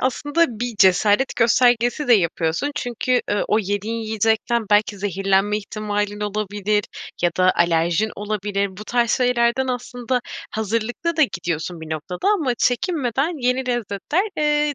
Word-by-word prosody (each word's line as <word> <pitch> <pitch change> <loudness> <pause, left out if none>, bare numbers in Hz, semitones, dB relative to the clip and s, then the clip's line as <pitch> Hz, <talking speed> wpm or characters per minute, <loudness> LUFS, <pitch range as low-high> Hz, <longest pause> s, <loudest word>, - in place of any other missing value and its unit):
aslında 290 +6 +1
bir 245 -2 -2
cesaret 205 +7 +3
göstergesi 245 +3 +3
de - - +7
yapıyorsun. 170 - 0
Çünkü, 245 +1 0
ııı, 205 - +1
o 215 - +3
yediğin 205 +2 -2
yiyecekten 225 +1 0
belki 205 -1 +2
zehirlenme 195 +1 +1
ihtimalin 210 0 -3
olabilir 210 0 -1 0.4
ya 175 - +3
da 185 0 +4
alerjin 170 +4 +2
olabilir. 200 -2 -2
Bu 210 - -8
tarz 235 0 +1
şeylerden 250 0 +2
aslında 245 0 -2 0.3
hazırlıklı 230 - -2
da 315 - +4
gidiyorsun 175 - -2
bir 160 - -9
noktada 160 - -3
ama 275 -10 0
çekinmeden 275 +2 0
yeni 250 0 0
lezzetler, 240 - -1
eee, 295 -1 +1
220 Hz, 135 wpm, -21 LUFS, 200-250 Hz, 0.4 s, de